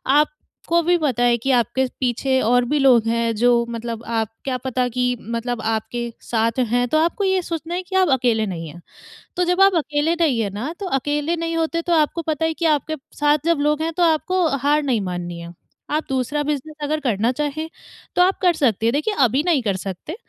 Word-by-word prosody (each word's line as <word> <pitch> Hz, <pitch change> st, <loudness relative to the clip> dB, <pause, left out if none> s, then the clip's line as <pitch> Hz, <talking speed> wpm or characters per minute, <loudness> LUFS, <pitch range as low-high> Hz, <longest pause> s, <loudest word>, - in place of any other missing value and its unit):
आपको 300 Hz, +3 st, 0 dB
भी 350 Hz, +1 st, +3 dB
पता 260 Hz, -7 st, 0 dB
है 240 Hz, 0 st, +4 dB
कि 270 Hz, +4 st, -1 dB
आपके 240 Hz, +3 st, 0 dB, 0.2 s
पीछे 260 Hz, +1 st, +1 dB
और 245 Hz, +2 st, +3 dB
भी 295 Hz, +4 st, 0 dB
लोग 250 Hz, -5 st, +4 dB
हैं, 230 Hz, 0 st, 0 dB
जो 240 Hz, +1 st, +3 dB
मतलब 230 Hz, -1 st, -5 dB
आप 225 Hz, -2 st, -1 dB, 0.2 s
क्या 260 Hz, -2 st, -1 dB
पता 255 Hz, -1 st, 0 dB
कि 250 Hz, +1 st, 0 dB
मतलब 230 Hz, +1 st, -3 dB
आपके 225 Hz, +2 st, -2 dB, 0.2 s
साथ 230 Hz, +1 st, +1 dB
हैं, 245 Hz, +1 st, +1 dB
तो 310 Hz, -, +1 dB
आपको 340 Hz, +5 st, +1 dB
ये 380 Hz, -1 st, +2 dB
सोचना 335 Hz, 0 st, -4 dB
है 365 Hz, -, -3 dB
कि 380 Hz, +1 st, -7 dB
आप 370 Hz, -4 st, +3 dB
अकेले 230 Hz, -3 st, +1 dB
नहीं 170 Hz, -5 st, -5 dB
हैं। 175 Hz, +3 st, -12 dB, 0.6 s
तो 360 Hz, -, +2 dB
जब 360 Hz, +2 st, +1 dB
आप 390 Hz, -1 st, +6 dB
अकेले 300 Hz, +1 st, 0 dB
नहीं 275 Hz, -8 st, +2 dB
हैं 205 Hz, -, -1 dB
ना, 240 Hz, -, -4 dB
तो 400 Hz, -, -4 dB
अकेले 295 Hz, +4 st, -1 dB
नहीं 330 Hz, 0 st, -2 dB
होते, 330 Hz, +1 st, 0 dB
तो 345 Hz, 0 st, -1 dB
आपको 320 Hz, +1 st, +2 dB
पता 315 Hz, 0 st, -1 dB
है 320 Hz, -, 0 dB
कि 335 Hz, -, -3 dB
आपके 315 Hz, 0 st, +1 dB, 0.2 s
साथ 295 Hz, 0 st, +3 dB
जब 335 Hz, -3 st, +2 dB
लोग 300 Hz, +1 st, +1 dB
हैं, 330 Hz, +1 st, -2 dB
तो 355 Hz, -, +3 dB
आपको 340 Hz, +2 st, +2 dB
हार 290 Hz, +3 st, +2 dB
नहीं 250 Hz, -6 st, 0 dB
माननी 175 Hz, -2 st, -5 dB
है। 170 Hz, 0 st, -9 dB, 0.4 s
आप 305 Hz, +1 st, 0 dB
दूसरा 265 Hz, +3 st, -1 dB
बिज़नेस 300 Hz, +1 st, -3 dB
अगर 305 Hz, +1 st, -1 dB
करना 230 Hz, -3 st, +1 dB
चाहें, 300 Hz, +3 st, -3 dB, 0.5 s
तो 360 Hz, -, +4 dB
आप 375 Hz, +2 st, +3 dB
कर 360 Hz, -2 st, +4 dB
सकती 230 Hz, -, +1 dB
हैं। 230 Hz, -, +2 dB
देखिए, 305 Hz, +10 st, 0 dB
अभी 260 Hz, +1 st, +3 dB
नहीं 310 Hz, -7 st, +3 dB
कर 200 Hz, -4 st, 0 dB
सकते, 195 Hz, -, -6 dB
275 Hz, 220 wpm, -21 LUFS, 235-320 Hz, 0.6 s, आप